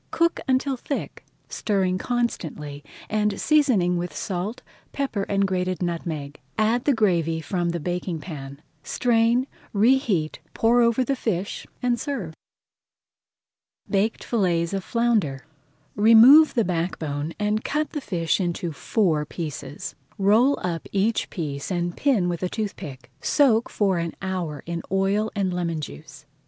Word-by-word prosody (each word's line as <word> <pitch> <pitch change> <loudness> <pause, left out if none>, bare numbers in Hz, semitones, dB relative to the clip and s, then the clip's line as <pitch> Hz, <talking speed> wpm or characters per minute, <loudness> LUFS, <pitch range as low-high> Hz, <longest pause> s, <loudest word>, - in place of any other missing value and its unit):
Cook 335 0 +1
until 260 +1 +1
thick, 280 +3 -5 0.2
stirring 190 -3 0
constantly, 160 - -3 0.2
and 210 -2 0
seasoning 240 - +3
with 175 0 -4
salt, 205 +7 -3 0.3
pepper, 250 -8 -2
and 200 0 +2
grated 185 -1 -1
nutmeg. 160 -4 -4 0.2
Add 225 +3 +2
the 285 - +4
gravy 170 -7 +2
from 175 +1 -1
the 170 0 -2
baking 175 0 -3
pan, 140 -3 -8 0.2
strain, 235 - +2 0.3
reheat, 215 - +2 0.2
pour 235 +2 +4
over 235 +2 +3
the 275 +2 0
fish, 200 -6 -3 0.2
and 240 -1 +1
serve. 230 - -4 1.6
BAKED 210 +2 +1
FILLETS 175 -6 0
OF 195 -1 -2
FLOUNDER 215 - 0 0.5
Remove 230 +9 +8
the 230 - +3
back 175 0 -1
bone 150 +1 -4
and 210 +1 0
cut 300 +1 -1
the 295 - -4
fish 170 - 0
into 175 -1 -2
four 160 -1 +1
pieces. 150 -2 -6 0.2
Roll 220 +8 +4
up 170 -2 -3
each 205 +3 +1
piece 145 -6 -4
and 175 -2 -1
pin 245 -11 +2
with 175 -2 -2
a 185 - -1
toothpick. 150 - -6
Soak 245 -6 +3
for 195 -4 +1
an 170 -1 -3
hour 180 -6 -3
in 170 0 -3
oil 195 +3 +1
and 190 -3 0
lemon 170 -2 -1
juice. 75 - -9
190 Hz, 140 wpm, -24 LUFS, 170-230 Hz, 1.6 s, Remove